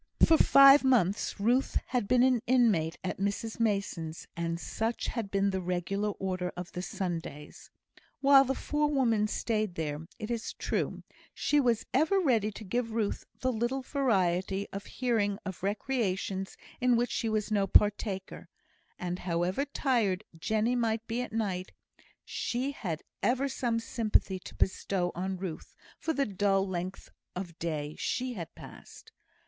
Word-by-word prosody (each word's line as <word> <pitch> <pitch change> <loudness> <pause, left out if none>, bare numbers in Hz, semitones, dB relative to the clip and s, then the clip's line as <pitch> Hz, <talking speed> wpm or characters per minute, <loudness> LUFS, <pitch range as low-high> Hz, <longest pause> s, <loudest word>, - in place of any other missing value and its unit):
For 325 - +6
five 275 +1 +8
months 220 -7 +2
Ruth 245 +6 +2
had 245 -5 0
been 250 +2 +4
an 255 -3 +3
inmate 215 -11 +3
at 185 - -3
Mrs 205 +3 -2
Mason's, 195 -7 -1
and 170 0 -2
such 225 +5 -2
had 230 -5 -3
been 200 0 +1
the 190 -1 -2
regular 180 +3 -1
order 185 -2 -3
of 180 0 -6
the 180 - -4
Sundays. 170 -5 -5 0.5
While 275 -1 +7
the 270 0 -1
forewoman 270 -9 +1
stayed 215 -3 -1
there, 155 0 -4
it 215 0 -5
is 230 -1 -3
true, - - -2 0.3
she 295 - +2
was 240 -5 +2
ever 315 +9 +3
ready 235 - +2
to 215 +1 -9
give 230 +3 -2
Ruth 220 -3 -1 0.2
the 255 - +1
little 240 +4 -1
variety 195 -8 +1
of 200 0 -6
hearing 220 -6 0
of 190 -2 -6
recreations 195 -2 -2 0.2
in 250 -1 +4
which 240 +1 +1
she 225 - -1
was 215 0 -1
no 200 -2 +2
partaker; 205 -2 +1 0.5
and 180 0 -3
however 180 +8 0
tired 235 -9 0
Jenny 220 +8 0
might 230 -2 0
be 230 +2 -2
at 250 - -5
night, 195 -5 -2 0.5
she 255 +3 -2
had 175 - -4 0.2
ever 260 +3 +2
some 240 -4 -1
sympathy 215 -4 +1
to - - -11
bestow 185 -1 0
on 190 +2 -3
Ruth 180 -4 -7 0.2
for 325 - -1
the 280 -3 +1
dull 195 -1 +1
length 185 +1 -5 0.2
of 180 -2 -6
day 155 -3 -3
she 255 0 -1
had 170 -7 -7
passed. - - -13
210 Hz, 155 wpm, -30 LUFS, 185-245 Hz, 0.5 s, five